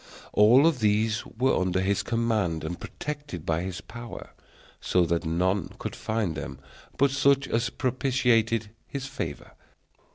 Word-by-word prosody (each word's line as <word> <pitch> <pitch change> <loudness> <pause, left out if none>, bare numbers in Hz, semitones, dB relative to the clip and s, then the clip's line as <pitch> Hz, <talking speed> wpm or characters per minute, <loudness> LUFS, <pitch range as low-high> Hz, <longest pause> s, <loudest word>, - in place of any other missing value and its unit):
All 125 +10 +6
these 110 -3 +1
were 130 +3 +1
under 95 0 +1
his 100 +1 +1
command, 110 -9 0
and 85 +2 -4
protected 145 - -6
by 80 0 0
his 90 -1 -5
power, 120 0 -9 0.5
so 90 -1 +2
that 85 0 0
none 90 +2 0
could - - -5
find 110 -6 -1
them 70 -2 -6 0.4
but 140 0 +4
such 140 0 +3
as 115 +2 0
propitiated 120 -4 +1 0.2
his 140 -1 -5
favor. 135 - -5
110 Hz, 135 wpm, -27 LUFS, 90-130 Hz, 0.5 s, All